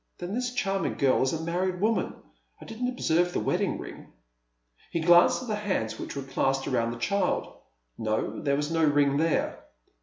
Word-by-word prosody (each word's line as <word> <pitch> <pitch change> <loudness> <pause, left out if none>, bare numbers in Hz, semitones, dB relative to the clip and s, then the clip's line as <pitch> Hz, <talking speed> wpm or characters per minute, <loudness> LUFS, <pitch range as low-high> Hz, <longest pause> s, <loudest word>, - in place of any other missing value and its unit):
" - - -48
Then 175 +2 -5
this 245 +1 -1
charming 195 -5 -1
girl 135 -2 +3
is 130 - +2
a 160 0 -3
married 180 +2 -1
woman! 220 +3 0 0.4
I - - -11
didn't 235 +2 -3
observe 175 -8 +1
the - - 0
wedding - - 0
iing." - - -9 0.8
He 170 - -2
glanced 175 +8 +5
at - - -8
the 220 - -1
hands 185 - -2
which - - -6
were 140 - -4
clasped 135 0 0
round 115 -2 0
the 120 - -6
child. 200 +12 -1 0.4
No, 110 0 -2
there 140 -1 +1
was 150 +2 -2
no 165 -1 +1
ring 145 -2 +3
there. 160 +1 0
165 Hz, 190 wpm, -27 LUFS, 140-195 Hz, 0.8 s, glanced